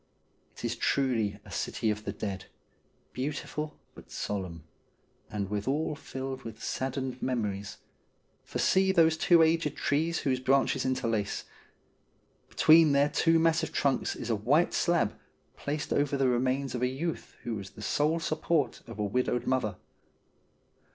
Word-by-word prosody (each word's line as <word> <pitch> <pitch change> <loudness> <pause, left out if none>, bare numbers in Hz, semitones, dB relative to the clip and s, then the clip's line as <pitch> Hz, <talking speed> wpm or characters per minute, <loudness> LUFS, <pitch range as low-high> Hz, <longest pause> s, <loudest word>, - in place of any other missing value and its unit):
It - - -6
is - - -1
truly 115 -7 +1
a - - -12
City 110 - -1
of 105 0 -5
the - - -2
Dead, 95 -3 -5 0.7
beautiful 150 +3 -4 0.2
but - - -14
solemn, 90 -6 -4 0.7
and 100 -2 -3
withal 130 +11 -1
filled 130 -2 -6
with 115 0 -9
saddened 130 -1 -3
memories, 105 -6 -2 0.7
for - - -5
see 190 0 +3
those 165 -3 +4
two 165 +1 +5
aged 160 -1 +1
trees 160 +4 0
whose 130 -2 0
branches 135 +1 +2
interlace. 115 -5 -1 1.1
Between 155 -2 +6
their 140 +1 +4
two 165 +1 +3
massive 160 0 +2
trunks 140 -2 0
is 120 - -4
a - - +3
white 135 +11 +2
slab 170 -11 +2 0.4
placed 150 +1 -3
over 145 -1 +1
the 135 -1 +2
remains 130 +2 0
of 125 - -3
a 125 - +3
youth 150 +6 -4
who 120 - -3
was 100 -3 -5
the 105 - -11
sole 155 +7 +1
support 160 -2 0
of 115 -2 -9
a 105 - -1
widowed 125 +3 0
mother. 125 -7 0
130 Hz, 145 wpm, -29 LUFS, 110-155 Hz, 1.1 s, Between